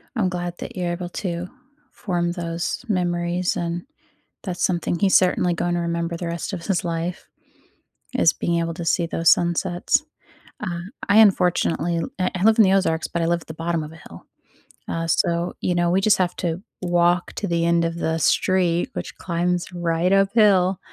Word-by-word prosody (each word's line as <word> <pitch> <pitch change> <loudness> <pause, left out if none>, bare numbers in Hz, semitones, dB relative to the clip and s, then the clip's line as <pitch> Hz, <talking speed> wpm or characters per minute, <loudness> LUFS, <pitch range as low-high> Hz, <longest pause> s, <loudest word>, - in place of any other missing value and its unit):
I'm 200 -6 +1
glad 175 -1 -4
that 245 - -7
you're 175 -1 -1
able 175 0 -5
to 175 -1 -4 0.4
form 175 -3 -2
those 170 +6 -4
memories, 175 -2 0
and 170 0 -3 0.6
that's 180 -4 -3
something 175 -1 0
he's 195 -2 +3
certainly 180 -1 +2
gonna 175 0 -1
remember 170 0 -2
the 175 - -5
rest 170 +3 -4
of 175 -3 -5
his 195 -4 0
life, 170 +1 -3 0.9
is 165 - +4
being 170 -1 -1
able 165 0 -2
to 170 - -6
see 170 0 +1
those 165 0 +2
sunsets. 175 - +1 0.6
Uh, 175 -5 -3 0.3
I 205 +2 +5
unfortunately 180 -4 +3
l 165 - -2 0.3
I 185 - -3
live 220 +1 +5
in 220 - +8
the 190 - +3
Ozarks, 180 -4 +1
but 170 - -2
I - - +1
live 170 0 +1
at - - -17
the 160 - -7
bottom 165 0 -2
of 155 +1 -8
a - - -12
hill. 85 - -13 0.6
Uh, 165 0 -2
so, 170 +2 +1
you 180 - 0
know, 175 0 +2
we 185 +2 +3
just 205 0 +3
have 180 -1 0
to 175 +1 -3 0.2
walk 175 0 +2
to 205 - -3
the 170 -1 +1
end 170 0 +2
of 165 0 -2
the 165 -1 -1
street, 175 +3 +2
which - - -6
climbs 175 0 -2
right 175 +1 0
uphill, 195 -2 +4
175 Hz, 185 wpm, -22 LUFS, 170-185 Hz, 0.9 s, in